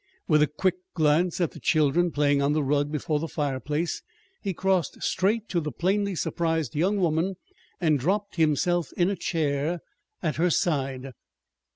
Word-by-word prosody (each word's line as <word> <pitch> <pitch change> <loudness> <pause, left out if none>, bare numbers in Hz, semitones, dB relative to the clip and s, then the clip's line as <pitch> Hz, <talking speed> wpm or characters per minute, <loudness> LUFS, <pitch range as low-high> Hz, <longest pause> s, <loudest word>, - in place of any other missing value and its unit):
With 155 -2 +4
a 150 - +5
quick 180 +5 0 0.2
glance 160 +2 +2
at 170 -3 +1
the - - -11
children 160 +2 +2
playing 145 -2 +2
on 140 +1 +2
the 155 -1 +1
rug 145 +1 +1
before 150 0 -1
the 165 - -3
fireplace, 150 +2 -2 0.4
he 200 - -2
crossed 185 -3 0
straight 210 +4 +1
to 175 - +1
the 150 -2 -3
plainly 200 +2 0
surprised 160 -4 -1
young 185 +7 +1
woman 175 +1 +1 0.4
and 155 -5 +2
dropped 200 +7 -1
himself 165 +1 +2
in 180 +2 +2
a - - -1
chair 160 -1 -1 0.4
at 155 -3 -1
her 175 +3 +3
side. 135 -6 -1
160 Hz, 165 wpm, -26 LUFS, 150-180 Hz, 0.4 s, a